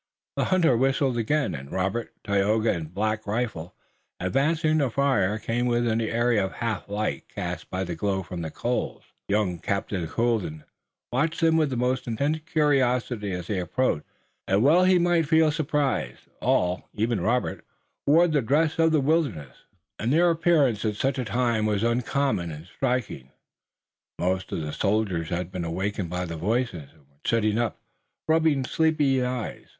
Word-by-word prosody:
The -, -, +1 dB
hunter 175 Hz, -8 st, +3 dB
whistled 135 Hz, +1 st, +1 dB
again, 135 Hz, +6 st, 0 dB
and 70 Hz, -1 st, -8 dB
Robert, 95 Hz, +5 st, -2 dB
Tayoga 105 Hz, +2 st, +2 dB
and 80 Hz, -3 st, -5 dB
Black 110 Hz, +3 st, -2 dB
Rifle, 105 Hz, -6 st, -3 dB, 0.4 s
advancing 150 Hz, -, +1 dB
from 155 Hz, -, +3 dB
the 140 Hz, -3 st, +1 dB
forest, 115 Hz, -6 st, +1 dB
came 120 Hz, +2 st, 0 dB
within 120 Hz, -2 st, +1 dB
the 110 Hz, -, -1 dB
area 115 Hz, -2 st, +2 dB
of 95 Hz, -, -3 dB
half 110 Hz, -4 st, -3 dB
light 105 Hz, +1 st, -3 dB
cast -, -, -5 dB
by 95 Hz, +1 st, -2 dB
the 90 Hz, -2 st, -4 dB
glow 95 Hz, +3 st, -1 dB
from 90 Hz, -1 st, -6 dB
the 80 Hz, -, -4 dB
coals, -, -, -3 dB, 0.2 s
young 100 Hz, -4 st, 0 dB
Captain 95 Hz, -1 st, -2 dB
Colden 110 Hz, -9 st, -1 dB, 0.5 s
watching 160 Hz, +6 st, +1 dB
them 160 Hz, -, +3 dB
with 155 Hz, -3 st, +2 dB
the 130 Hz, -, -3 dB
most 125 Hz, +1 st, 0 dB
intense 140 Hz, +7 st, 0 dB
curiosity 125 Hz, -, +1 dB
as 90 Hz, -2 st, -4 dB
they 100 Hz, 0 st, -2 dB
approached. 90 Hz, -1 st, 0 dB, 0.4 s
And 100 Hz, +3 st, +3 dB
well 170 Hz, +7 st, +5 dB
he 185 Hz, 0 st, +5 dB
might 170 Hz, -2 st, +2 dB
feel 160 Hz, -1 st, +4 dB
surprise. 145 Hz, -, -1 dB, 0.2 s
All, 90 Hz, 0 st, +1 dB
even 110 Hz, -2 st, 0 dB
Robert, 120 Hz, +7 st, 0 dB, 0.4 s
wore 165 Hz, +5 st, +6 dB
the 150 Hz, -4 st, +1 dB
dress 150 Hz, +7 st, +1 dB
of 165 Hz, 0 st, +4 dB
the 155 Hz, -2 st, +3 dB
wilderness, 130 Hz, -, 0 dB, 0.4 s
and 115 Hz, +4 st, 0 dB
their 170 Hz, +3 st, +4 dB
appearance 155 Hz, -10 st, +2 dB
at 105 Hz, -2 st, 0 dB
such 135 Hz, +5 st, -1 dB
a 125 Hz, -, -1 dB
time 115 Hz, -2 st, +1 dB
was 105 Hz, 0 st, 0 dB
uncommon 120 Hz, -4 st, 0 dB
and 80 Hz, 0 st, -8 dB
striking. 120 Hz, -, -2 dB, 0.9 s
Most 90 Hz, +1 st, -1 dB
of -, -, -2 dB
the 75 Hz, -1 st, -4 dB
soldiers 100 Hz, -6 st, 0 dB
had 90 Hz, +1 st, -3 dB
been 90 Hz, -2 st, -4 dB
awakened 95 Hz, +2 st, -2 dB
by 90 Hz, +1 st, -2 dB
the 85 Hz, -1 st, -5 dB
voices, 100 Hz, -, -1 dB
and 80 Hz, -, -24 dB
were 70 Hz, 0 st, -32 dB
sitting 110 Hz, -1 st, +1 dB
up, 120 Hz, -4 st, -1 dB, 0.5 s
rubbing 160 Hz, -4 st, +3 dB
sleepy 150 Hz, -4 st, +2 dB
eyes. 125 Hz, -2 st, -4 dB
115 Hz, 170 wpm, -26 LUFS, 95-140 Hz, 0.9 s, wore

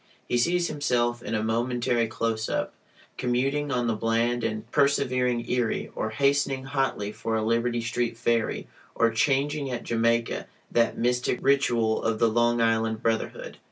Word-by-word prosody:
He -, -, -1 dB
sees 175 Hz, +6 st, +2 dB
himself 120 Hz, -5 st, 0 dB
(in 115 Hz, -, -3 dB
a 110 Hz, -, 0 dB
momentary 120 Hz, +1 st, 0 dB
close 110 Hz, 0 st, -2 dB
up) -, -, -2 dB, 0.5 s
commuting 135 Hz, +4 st, 0 dB
on 125 Hz, -2 st, 0 dB
the 115 Hz, -, +1 dB
bland 115 Hz, +2 st, 0 dB
and 110 Hz, -1 st, -2 dB
persevering 130 Hz, -4 st, +1 dB
Erie, 125 Hz, -3 st, -1 dB
or 110 Hz, -, -2 dB
hastening 140 Hz, +2 st, +1 dB
hotly 135 Hz, -6 st, -1 dB
for 110 Hz, +1 st, -3 dB
a 110 Hz, -, 0 dB
Liberty 115 Hz, +1 st, +1 dB
Street 115 Hz, 0 st, -2 dB
ferry, 115 Hz, -1 st, 0 dB, 0.3 s
or 115 Hz, 0 st, +3 dB
changing 140 Hz, +4 st, +1 dB
at 120 Hz, -2 st, -4 dB
Jamaica 115 Hz, 0 st, 0 dB, 0.2 s
(that 115 Hz, -1 st, +2 dB
mystic 125 Hz, +1 st, +1 dB
ritual 120 Hz, -5 st, +2 dB
of 115 Hz, -1 st, 0 dB
the 115 Hz, +1 st, +3 dB
Long 120 Hz, +1 st, +2 dB
Island 115 Hz, 0 st, +1 dB
brotherhood). 115 Hz, -1 st, -2 dB
120 Hz, 155 wpm, -26 LUFS, 115-130 Hz, 0.5 s, or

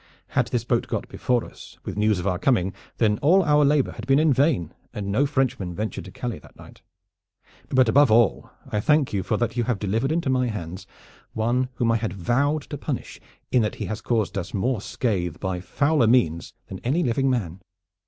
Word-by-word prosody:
Had -, -, +1 dB
this 120 Hz, -2 st, -1 dB
boat 120 Hz, -1 st, 0 dB
got -, -, -3 dB
before 125 Hz, -2 st, 0 dB
us -, -, -13 dB
with -, -, -5 dB
news 105 Hz, 0 st, +2 dB
of 90 Hz, -, -4 dB
our 90 Hz, -3 st, 0 dB
coming, 95 Hz, -8 st, +1 dB, 0.2 s
then 105 Hz, -2 st, +2 dB
all 185 Hz, +7 st, +4 dB
our 150 Hz, -2 st, +4 dB
labor 145 Hz, -1 st, +3 dB
had -, -, -9 dB
been 135 Hz, 0 st, +4 dB
in 155 Hz, -1 st, +4 dB
vain, 130 Hz, -, +1 dB, 0.2 s
and 100 Hz, -1 st, -3 dB
no 135 Hz, +8 st, +2 dB
Frenchman 130 Hz, -, -1 dB
ventured 110 Hz, +3 st, -4 dB
to -, -, -10 dB
Calais 120 Hz, -8 st, -5 dB
that -, -, -18 dB
night. -, -, -15 dB, 0.9 s
But 130 Hz, -1 st, +4 dB
above 140 Hz, +5 st, +5 dB
all 115 Hz, -1 st, +3 dB, 0.2 s
I 105 Hz, -, -1 dB
thank 150 Hz, +3 st, +2 dB
you 100 Hz, -, 0 dB
for 100 Hz, +4 st, -1 dB
that 115 Hz, 0 st, -1 dB
you 120 Hz, -2 st, 0 dB
have 120 Hz, -3 st, 0 dB
delivered 110 Hz, +8 st, -1 dB
into 165 Hz, -1 st, 0 dB
my 130 Hz, -1 st, +2 dB
hands 90 Hz, -5 st, -6 dB, 0.5 s
one 120 Hz, +3 st, 0 dB
whom 115 Hz, -2 st, +1 dB
I 115 Hz, -, +3 dB
had 110 Hz, -4 st, -3 dB
vowed 135 Hz, -, 0 dB
to 145 Hz, -, -4 dB
punish 140 Hz, -3 st, -5 dB, 0.3 s
in 125 Hz, -, +4 dB
that 105 Hz, -, -1 dB
he -, -, -4 dB
has 110 Hz, 0 st, -4 dB
caused 105 Hz, -4 st, 0 dB
us 90 Hz, +2 st, -6 dB
more 115 Hz, +2 st, 0 dB
scathe 90 Hz, -9 st, -2 dB
by 95 Hz, -2 st, -2 dB
fouler 140 Hz, -, +1 dB
means 95 Hz, -9 st, +1 dB
than 95 Hz, -, -8 dB
any 150 Hz, +9 st, 0 dB
living 135 Hz, +3 st, +1 dB
man. 95 Hz, -8 st, -2 dB
115 Hz, 210 wpm, -24 LUFS, 100-135 Hz, 0.9 s, above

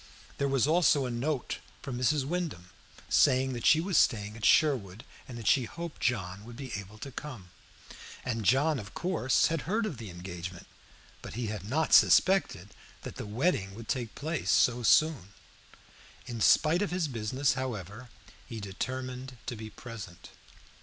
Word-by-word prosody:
There 140 Hz, -, +1 dB
was 135 Hz, -2 st, +2 dB
also 155 Hz, -3 st, +3 dB
a 125 Hz, -, -3 dB
note 130 Hz, +3 st, -2 dB, 0.2 s
from 130 Hz, -, -5 dB
Mrs. 130 Hz, +3 st, +1 dB
Wyndham, 150 Hz, -, -4 dB, 0.4 s
saying 130 Hz, +1 st, +3 dB
that 120 Hz, -, -1 dB
she 155 Hz, -, +6 dB
was 175 Hz, 0 st, +2 dB
staying 105 Hz, -1 st, +1 dB
at 115 Hz, -, -11 dB
Sherwood, 120 Hz, -, +3 dB, 0.2 s
and 125 Hz, -, -8 dB
that 115 Hz, -, -8 dB
she 130 Hz, +3 st, +4 dB
hoped 170 Hz, +6 st, -8 dB
John 100 Hz, -5 st, -1 dB
would 120 Hz, +1 st, -11 dB
be 130 Hz, -1 st, -7 dB
able 105 Hz, +1 st, -7 dB
to 135 Hz, +5 st, -8 dB
come. 120 Hz, -10 st, -8 dB, 0.7 s
John 130 Hz, +6 st, +2 dB
had, -, -, -6 dB
of -, -, -17 dB
course, 170 Hz, -8 st, +1 dB
heard 180 Hz, +8 st, 0 dB
of 160 Hz, -, -5 dB
the 110 Hz, -3 st, -7 dB
engagement, 90 Hz, 0 st, -7 dB, 0.6 s
but -, -, -8 dB
he 120 Hz, 0 st, -2 dB
had 100 Hz, -1 st, -7 dB
not 155 Hz, +4 st, 0 dB
suspected 170 Hz, -, +5 dB, 0.3 s
that -, -, -8 dB
the -, -, -6 dB
wedding 105 Hz, -, 0 dB
would 115 Hz, 0 st, -10 dB
take 120 Hz, -4 st, -3 dB
place 155 Hz, -, -3 dB
so 120 Hz, +6 st, +4 dB
soon. 120 Hz, -, +3 dB, 0.9 s
In 120 Hz, -3 st, -6 dB
spite 160 Hz, -, +4 dB
of 205 Hz, -, 0 dB
his 180 Hz, -2 st, -1 dB
business, 130 Hz, +3 st, 0 dB
however, 120 Hz, -2 st, -5 dB, 0.3 s
he 115 Hz, -3 st, -8 dB
determined 130 Hz, +5 st, -5 dB
to 120 Hz, -, -4 dB
be 110 Hz, 0 st, -8 dB
present. 105 Hz, -8 st, -10 dB
125 Hz, 165 wpm, -30 LUFS, 105-145 Hz, 0.9 s, she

